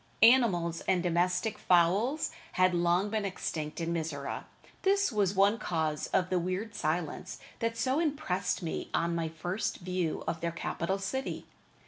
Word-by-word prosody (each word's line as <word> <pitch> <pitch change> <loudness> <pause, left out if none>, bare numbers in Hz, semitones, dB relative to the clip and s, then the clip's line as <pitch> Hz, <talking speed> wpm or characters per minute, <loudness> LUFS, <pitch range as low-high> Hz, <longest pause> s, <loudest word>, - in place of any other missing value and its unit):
Animals 195 -9 +5
and 180 -2 +2
domestic 180 +4 +1
fowls 195 - +3 0.2
had 185 0 +4
long 175 +3 +2
been 215 -1 0
extinct 155 -5 -4
in 170 0 -1
Mizora. 155 -4 -3 0.4
This 395 -3 +3
was 200 -3 +1
one 200 +4 +4
cause 160 -6 -1
of 185 -1 +1
the 185 - +3
weird 185 +5 -3
silence 160 -3 -2 0.2
that 230 0 -1
so 260 +6 +1
impressed 275 - -1
me 165 - -3
on 170 0 +1
my 165 -1 -1
first 175 +6 -3
view 180 -3 -2
of 165 - -2
their 170 0 -1
capital 170 +2 -2
city. 265 +8 -3
180 Hz, 150 wpm, -30 LUFS, 170-215 Hz, 0.4 s, Animals